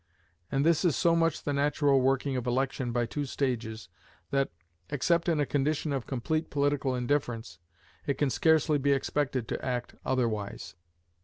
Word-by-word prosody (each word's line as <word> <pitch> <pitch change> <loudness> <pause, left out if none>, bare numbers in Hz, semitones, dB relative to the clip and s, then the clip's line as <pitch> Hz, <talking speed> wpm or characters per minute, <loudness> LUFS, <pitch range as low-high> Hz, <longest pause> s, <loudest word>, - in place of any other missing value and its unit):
And 135 +2 +1
this 165 0 +3
is 175 -5 +3
so 170 -2 +3
much 165 -2 +1
the 145 - -1
natural 140 -1 +3
working 135 +1 +1
of 125 -1 -3
election 130 0 0
by 120 0 +1
two 145 +5 -3
stages, 115 - -2 0.4
that, 135 0 +1 0.4
except 170 +5 +1
in 160 -3 +2
a 145 - +2
condition 145 +2 0
of 135 -3 -3
complete 155 +5 -1
political 140 -2 +1
indifference, 120 -7 -2 0.5
it 140 - +1
can 135 0 +1
scarcely 160 -3 +3
be 140 +1 +3
expected 135 -3 -1
to - - -3
act 125 -2 -2
otherwise. 115 -6 -2
135 Hz, 160 wpm, -29 LUFS, 125-150 Hz, 0.5 s, this